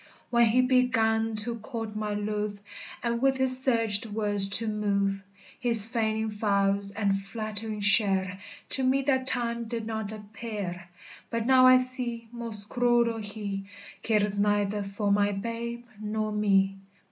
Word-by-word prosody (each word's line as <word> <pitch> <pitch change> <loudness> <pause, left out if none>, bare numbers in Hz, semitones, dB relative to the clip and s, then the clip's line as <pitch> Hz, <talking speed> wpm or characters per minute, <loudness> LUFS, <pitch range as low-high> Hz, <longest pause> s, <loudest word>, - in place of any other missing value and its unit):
_ - - -24 0.3
When 235 -1 +4
he 240 +3 +3
began 225 -3 +1
to 235 -1 -4
court 225 -1 -6
my 210 -1 -3
luve, 210 0 -3 0.5
And 235 0 -1
with 270 0 +2
his 260 0 0
sugred 230 -4 0
words 205 -2 +3
to 225 - -3
muve, 200 -2 -1 0.4
His 235 -5 +9
faynings 220 -2 -2
fals 200 -1 +1
and 200 -2 +1
flattering 215 +2 -5
cheire 195 -2 +2 0.3
To 265 - +3
me 265 +1 +2
that 260 -1 0
time 235 -2 -2
did 230 -1 -5
not 220 -1 -4
appeire: 210 -4 -7 0.4
But 230 -1 -3
now 255 0 +6
I 255 0 +8
see, 250 -2 -4
most 230 -4 -6
cruell 240 -2 +1
hee, 205 -2 -6 0.4
Cares 210 -2 0
neither 205 0 0
for 200 +1 -3
my 205 0 +2
babe 235 +3 -5
nor 215 0 -3
mee. 195 -2 +1
220 Hz, 145 wpm, -27 LUFS, 205-235 Hz, 0.5 s, His